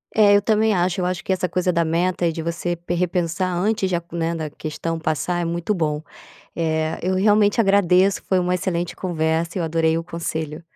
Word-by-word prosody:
É, 205 Hz, -2 st, +6 dB
eu 205 Hz, -, +4 dB
também 215 Hz, +1 st, +2 dB
acho. 180 Hz, 0 st, 0 dB
Eu -, -, 0 dB
acho 180 Hz, 0 st, -2 dB
que -, -, -2 dB
essa 185 Hz, -1 st, 0 dB
coisa 180 Hz, 0 st, 0 dB
da 170 Hz, -1 st, +1 dB
meta 175 Hz, +2 st, 0 dB
e 170 Hz, -, +2 dB
de 165 Hz, -, -4 dB
você 170 Hz, +1 st, -2 dB
pe 175 Hz, +1 st, -4 dB
repensar 180 Hz, +1 st, -1 dB
antes 200 Hz, +2 st, 0 dB
de 180 Hz, -, 0 dB
aco 170 Hz, 0 st, -6 dB
né, 165 Hz, 0 st, -1 dB
da 160 Hz, -2 st, -4 dB
questão 155 Hz, +2 st, -4 dB
passar 160 Hz, +2 st, -1 dB
é -, -, -1 dB
muito 170 Hz, +4 st, -1 dB
bom. 155 Hz, -5 st, -1 dB, 0.5 s
Eh, 160 Hz, -1 st, -1 dB
eu 185 Hz, +1 st, 0 dB
realmente 205 Hz, +2 st, +3 dB
agradeço 195 Hz, -2 st, +3 dB
foi 190 Hz, -, +3 dB
uma 180 Hz, 0 st, +1 dB
excelente 175 Hz, -1 st, -2 dB
conversa, 165 Hz, -1 st, -1 dB
eu 170 Hz, -, -1 dB
adorei 160 Hz, 0 st, +1 dB
o 165 Hz, -, -3 dB
conselho. 160 Hz, -1 st, -4 dB
175 Hz, 210 wpm, -22 LUFS, 165-185 Hz, 0.5 s, É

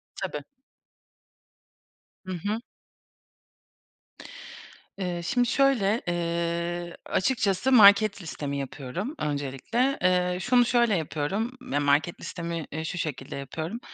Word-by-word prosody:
Tabii. -, -, -4 dB, 1.8 s
Hı 185 Hz, -, -5 dB
hı. 205 Hz, +6 st, -2 dB, 2.4 s
Eee, 180 Hz, -3 st, -3 dB
şimdi 245 Hz, +8 st, +1 dB
şöyle, 235 Hz, -6 st, +2 dB
eee, 170 Hz, 0 st, -2 dB
açıkçası 230 Hz, +2 st, +1 dB
market 205 Hz, -2 st, +7 dB
listemi 145 Hz, -4 st, -4 dB
yapıyorum 140 Hz, -, -5 dB
öncelikle. 150 Hz, -, -1 dB
Eee, 180 Hz, 0 st, +2 dB
şunu 245 Hz, +1 st, +4 dB
şöyle 235 Hz, -3 st, +3 dB
yapıyorum 165 Hz, +9 st, -2 dB, 0.2 s
yani 145 Hz, -, +1 dB
market 145 Hz, +4 st, +2 dB
listemi, 170 Hz, -2 st, -5 dB
eee, 160 Hz, +2 st, -4 dB
şu 160 Hz, +2 st, -4 dB
şekilde 145 Hz, -5 st, -4 dB
yapıyorum. 155 Hz, -, -5 dB
175 Hz, 100 wpm, -27 LUFS, 160-220 Hz, 2.4 s, market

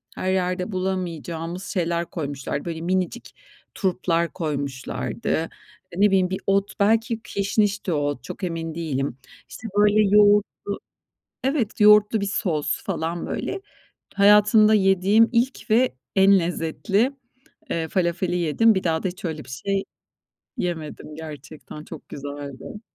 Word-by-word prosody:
her 185 Hz, -, -1 dB
yerde 180 Hz, +2 st, -1 dB
bulamayacağımız 180 Hz, -2 st, -3 dB
şeyler 170 Hz, -2 st, -1 dB
koymuşlardı. 140 Hz, -3 st, -4 dB
Böyle 165 Hz, -1 st, -4 dB
minicik 185 Hz, +6 st, -2 dB, 0.4 s
turplar 170 Hz, -3 st, 0 dB
koymuşlardı. 140 Hz, -, -4 dB, 0.6 s
E, 180 Hz, +3 st, -3 dB
ne 205 Hz, -, +7 dB
bileyim, 185 Hz, -2 st, +2 dB
bir 190 Hz, -, -3 dB
ot 195 Hz, +1 st, +1 dB
belki 225 Hz, +2 st, +2 dB
kişnişti 200 Hz, -3 st, 0 dB
o -, -, +1 dB
ot, 145 Hz, -3 st, -2 dB
çok 195 Hz, -, -8 dB
emin 165 Hz, -2 st, -3 dB
değilim. 140 Hz, -6 st, -2 dB, 0.3 s
İşte, 225 Hz, -, -8 dB
böyle, 210 Hz, +1 st, +5 dB
yoğurtlu 205 Hz, -1 st, +3 dB, 0.6 s
Evet 260 Hz, -6 st, -1 dB
yoğurtlu 210 Hz, 0 st, +6 dB
bir -, -, 0 dB
sos 170 Hz, -7 st, -1 dB
falan 165 Hz, +1 st, -3 dB
böyle, 390 Hz, 0 st, -3 dB, 0.5 s
hayatımda 210 Hz, +1 st, +6 dB
yediğim 195 Hz, +2 st, +4 dB
ilk 245 Hz, +2 st, 0 dB
ve 240 Hz, -, +3 dB, 0.2 s
en 195 Hz, 0 st, +6 dB
lezzetli, 180 Hz, -, 0 dB, 0.6 s
eee, 165 Hz, -1 st, -1 dB
falafeli 175 Hz, 0 st, 0 dB
yedim. 180 Hz, +7 st, +3 dB
Bir 190 Hz, -, -1 dB
daha 160 Hz, -2 st, 0 dB
da, 190 Hz, -, 0 dB
hiç 185 Hz, +1 st, -10 dB
öyle 160 Hz, -3 st, -4 dB
bir -, -, -18 dB
şey 195 Hz, +9 st, -2 dB, 0.7 s
yemedim 160 Hz, -3 st, -4 dB
gerçekten 150 Hz, -1 st, -9 dB
çok 160 Hz, -2 st, -11 dB
güzeldi. 145 Hz, +5 st, -8 dB
185 Hz, 130 wpm, -23 LUFS, 160-205 Hz, 0.7 s, ne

